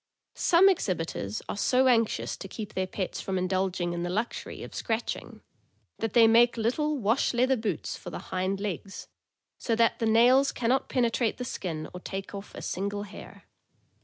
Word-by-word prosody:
Some 355 +3 +5
exhibitors 165 - -1
are - - -3
so 255 +5 +3
anxious 230 -3 +2
to 195 - -7
keep 210 +2 -7
their 185 0 -1
pets 185 0 -4
from 190 -1 -2
indulging 185 -1 0
in 170 - -3
the 175 - -2
luxury 220 +6 -3
of - - -9
scratch 225 0 -1
ing - - -12 0.6
that 225 -2 -2
they 235 -2 +7
make 235 +2 +5
little 295 +7 0
wash 235 +2 +1
leather 255 +2 +3
boots 215 -8 -3
for - - -8
the - - -6 0.2
hind 190 +1 0
legs, 195 -1 -5 0.5
so 230 - 0
that 230 0 +2
the 225 - +1
nails 245 +5 +5
can 230 -2 -2
not 265 +2 +1
penetrate 235 -2 +1
the 250 - -4
skin 160 -9 -4
or 180 - -6
take 195 +2 -6
off 200 0 -8
a - - -7
single 200 +2 -3
hair. 205 0 -11
220 Hz, 185 wpm, -28 LUFS, 190-240 Hz, 0.6 s, they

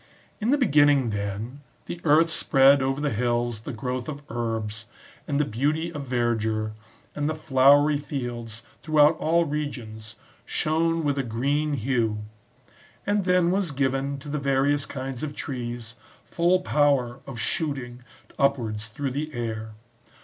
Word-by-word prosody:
In 220 +1 -1
the 285 - +4
beginning, 145 - +4
then, 105 +6 -4 0.2
the 170 - -6
earth 160 +2 +4
spread 135 -2 +5
over 135 +1 0
the 145 -1 0
hills 120 0 0
the 115 - -7
growth 125 +3 -4
of 145 -1 -7
herbs, 115 -2 -3 0.4
and 145 -1 0
the 150 - +3
beauty 150 +8 -1
of 145 -3 -6
verdure, 110 -3 0 0.4
and 150 0 -1
the 155 - -2
flowery 145 0 +4
fields, 120 -5 -5 0.2
throughout 155 0 +4
all 170 +2 +2
regions, 120 -7 -5 0.3
shone 165 +1 0
with 145 -2 0
a - - +1
green 140 +6 0
hue; 115 -4 0 0.8
and 205 -1 +1
then 180 -2 +3
was 190 -2 0
given, 135 0 -1
to 140 +2 -11
the 150 +1 -2
various 140 +1 +1
kinds 130 -2 -5
of 150 -1 -4
trees, 120 -4 -5 0.3
full 175 +2 +2
power 140 -7 +2
of 135 -3 -7
shooting 130 -2 -2 0.4
upwards 115 -6 0
through 135 +5 -4
the 150 +4 -3
air. 110 -2 -4
135 Hz, 145 wpm, -25 LUFS, 120-150 Hz, 0.8 s, spread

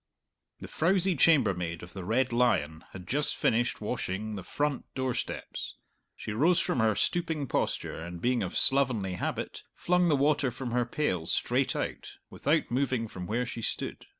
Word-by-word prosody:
The - - -6
frowsy 185 +2 +2
chambermaid 95 - +3
of 85 0 -10
the 95 - -6
"Red 120 +5 +1
Lion" 80 -10 +1
had 90 -2 -10
just 145 +6 +1
finished 120 0 +1
washing 110 -2 -3
the 95 - -5
front 145 - -2
door 130 -1 0
steps. - - -5 0.4
She - - -6
rose 160 +11 +3
from - - 0
her 110 -2 +3
stooping 160 -4 0
posture 80 - -2
and, 85 0 -7
being 125 +5 +1
of - - -2
slovenly 125 -9 +3
habit, 90 - -3
flung 180 0 +2
the 155 - +4
water 145 -1 +2
from 125 0 -5
her 120 0 +1
pail 95 - -1
straight - - +1
out, - - -4 0.2
without - - 0
moving 130 -2 0
from 90 -4 -7
where 120 +4 0
she 115 - -6
stood. - - -4
120 Hz, 170 wpm, -29 LUFS, 100-140 Hz, 0.4 s, the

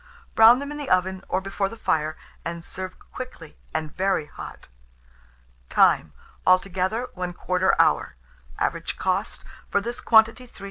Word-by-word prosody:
Brown 225 +2 +8
them 280 +2 -5
in 295 - -6
the 290 - -5
oven, 185 +1 +1
or 185 - 0
before 195 0 -2
the 230 - -10
fire, 155 -7 0 0.3
and 170 0 -5
serve 185 0 -7
quickly, 250 -12 -9 0.2
and 155 -1 -4
very 190 -4 +1
hot. - - -10 1.0
Time. 75 -2 +4 0.3
Altogether, 190 +5 +2
1/4 180 +1 0
hour. - - +2 0.4
Average - - -2
cost - - -1 0.3
for - - +2
this 235 +4 -5
quantity, 225 +2 +4
3s. - - -18
190 Hz, 140 wpm, -24 LUFS, 180-225 Hz, 1.0 s, Brown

